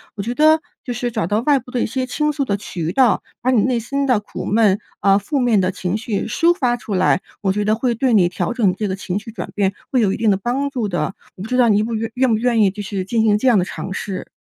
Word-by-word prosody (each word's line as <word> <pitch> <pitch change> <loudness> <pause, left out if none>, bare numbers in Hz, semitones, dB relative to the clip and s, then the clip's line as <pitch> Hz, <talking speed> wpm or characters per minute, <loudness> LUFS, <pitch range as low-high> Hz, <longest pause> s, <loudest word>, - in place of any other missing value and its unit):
我 205 - -4
觉 235 +4 -3
得 310 +2 +5 0.2
就 250 - -5
是 240 0 -2
找 220 -6 -1
到 205 +3 +1
外 280 +2 +3
部 250 - -15
的 245 - -1
一 - - +1
些 255 +3 -2
倾 300 +3 0
诉 280 -1 -1
的 200 -5 -1
渠 170 -5 -4
道， 255 +1 +3 0.2
把 255 - +1
你 240 -5 +4
内 250 +1 +1
心 275 +5 -2
的 250 -5 +3
苦 205 - -8
闷， 210 -2 +3 0.2
呃， 195 0 +4
负 280 +8 -2
面 235 -5 +3
的 185 0 0
情 185 0 -3
绪 215 -2 -2
抒 335 +10 +2
发 245 -7 +1
出 220 -3 -6
来， 185 - +2 0.2
我 190 -2 +1
觉 210 +1 -1
得 210 +1 +2
会 240 +1 0
对 250 +1 +1
你 185 -4 +5
调 175 - -2
整 225 -6 +2
这 210 0 -1
个 190 - -1
情 190 -1 -3
绪 220 +2 -10
转 185 -6 -6
变 195 -1 +1 0.2
会 255 - +3
有 200 -4 +2
一 - - -2
定 225 -1 +2
的 - - +3
帮 265 +6 -1
助 245 -6 -2
的。 175 0 -2 0.2
我 185 - -11
不 - - -6
知 250 - -1
道 245 -2 +5
你 210 0 +3
不 230 +1 -3
愿 225 +1 -3
愿 255 0 +2
不 220 - +2
愿 235 -1 +2
意 200 - +5
就 205 +2 -7
是 195 -2 -4
进 225 +2 0
行 210 -2 +4
这 260 - 0
样 240 -4 +5
的 - - +1
尝 190 - -6
试？ 200 -2 -5
220 Hz, 315 characters per minute, -19 LUFS, 200-250 Hz, 0.2 s, 得